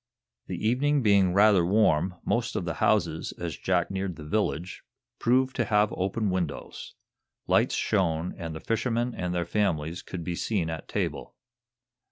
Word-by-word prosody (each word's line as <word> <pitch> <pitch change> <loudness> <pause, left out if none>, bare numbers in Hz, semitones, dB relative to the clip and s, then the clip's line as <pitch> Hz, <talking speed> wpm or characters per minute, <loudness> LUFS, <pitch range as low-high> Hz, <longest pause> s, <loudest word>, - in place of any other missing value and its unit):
The 110 - -2
evening 140 +4 +2
being 100 -4 +4
rather 100 -1 +5
warm, 90 -2 +2
most 115 0 0
of 90 - -2
the 85 - -2
houses, 85 -7 +1
as 85 -4 -5
Jack 90 -1 0
neared 95 -2 -3
the 75 - -10
village, 90 -1 -2 0.4
proved 130 +2 +2
to - - +1
have 105 -1 +2
open 100 +2 -1
windows. 90 -6 -4 0.5
Lights - - +2
shone, 90 -4 0
and 80 -3 -6
the - - -5
fishermen 115 +1 -1
and 90 -1 -3
their 90 -1 -1
families 85 -5 -1
could 90 -2 -7
be 90 - -3
seen 85 -2 -1
at 80 - -6
table. - - -3
95 Hz, 160 wpm, -27 LUFS, 85-110 Hz, 0.5 s, rather